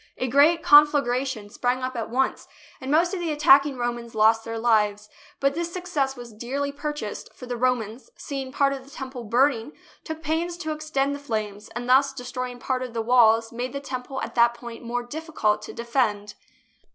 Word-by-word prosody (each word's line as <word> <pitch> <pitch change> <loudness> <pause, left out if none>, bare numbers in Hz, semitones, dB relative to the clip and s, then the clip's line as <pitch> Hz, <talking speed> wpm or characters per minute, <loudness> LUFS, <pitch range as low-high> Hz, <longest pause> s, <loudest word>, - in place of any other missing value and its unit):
A 255 - -1
great 295 +6 +4
conflagration 265 -6 +4
sprang 250 +2 -1
up 255 0 -3
at 225 -2 -3
once, 265 +3 -1 0.3
and 260 - -6
most 335 +5 +3
of 380 - -2
the 340 -2 -2
attacking 285 -2 +5
Romans 240 -1 -4
lost 220 +1 +4
their 230 0 -5
lives. 210 -2 +1 0.3
But 275 0 +2
this 340 +2 -3
success 330 -7 -2
was 240 -2 -10
dearly 270 +6 -3
purchased, 290 -6 -5
for 250 - -10
the 245 0 -4
Romans, 245 - -1
see 280 -2 -5
ing 260 -1 -7
part 275 +1 +2
of 270 -1 -7
the 270 - -17
Temple 260 -3 -7
burning, 245 +3 +1 0.3
took 315 0 -7
pains 330 +3 -1
to 315 -3 -4
ex 305 0 -6
tend 275 -1 +1
the 285 - -5
flames, 215 -6 -4
and, 245 0 -4
thus 270 +2 +4
destroying 250 -1 -5
part 255 +1 -2
of 250 -2 -6
the 225 - 0
walls, 230 -1 +4
made 245 +3 -4
the 280 - -3
Temple 265 -1 -5
at - - -5
that 235 0 +4
point 235 -1 -9
more 240 +1 -3
difficult 240 -6 -1
to - - -8
defend. 230 -4 -1
255 Hz, 200 wpm, -25 LUFS, 235-285 Hz, 0.3 s, attacking